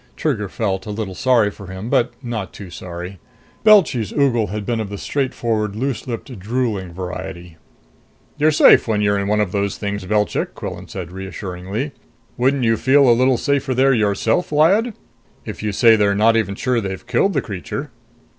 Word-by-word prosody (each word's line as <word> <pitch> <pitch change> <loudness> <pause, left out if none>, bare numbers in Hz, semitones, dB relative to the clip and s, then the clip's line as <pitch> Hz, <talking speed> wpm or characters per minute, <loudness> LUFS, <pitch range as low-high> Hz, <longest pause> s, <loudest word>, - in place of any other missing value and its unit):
Trigger 110 -10 -1
felt 95 -3 -2
a - - -5
little 105 -2 -4
sorry 115 0 +2
for 100 -1 -12
him, 95 +4 -7
but 120 0 +2
not 115 -5 -4
too 95 -4 -10
sorry. 90 +2 -8 0.4
Belchy's 185 - +4
ogle 125 -6 +2
had 105 +2 -5
been 115 0 -1
of 110 -3 -3
the 100 - -6
straightforward, 115 -6 -2
loose 130 +2 -3
lipped, 120 -1 -6
drooling 105 -3 -2
variety. 90 -1 -7 0.8
"You're 150 +1 +3
safe 150 - +6
when 105 -2 +1
you're 100 -1 +2
in 100 - -2
one 105 +1 +1
of 105 -4 0
those 100 0 -1
things, 100 -1 -4
Belchik!" 105 +2 0
Quillan - - -7
said 90 -3 -7
reassuringly. 95 +6 -5 0.4
"Wouldn't 130 +2 +1
you 115 -1 +3
feel 135 +1 +4
a 120 - +7
little 130 +1 +3
safer 140 -1 0
there 135 +2 +4
yourself, 110 - +1
Lyad? 195 +10 +3 0.5
If - - -7
you 105 -1 -1
say 115 +3 +5
they're 100 -2 +2
not 110 +2 +4
even 100 -3 0
sure 125 +2 0
they've 95 -2 -5
killed 195 - +1
the 140 - +1
creature...." 95 -8 -6
110 Hz, 180 wpm, -20 LUFS, 100-130 Hz, 0.8 s, a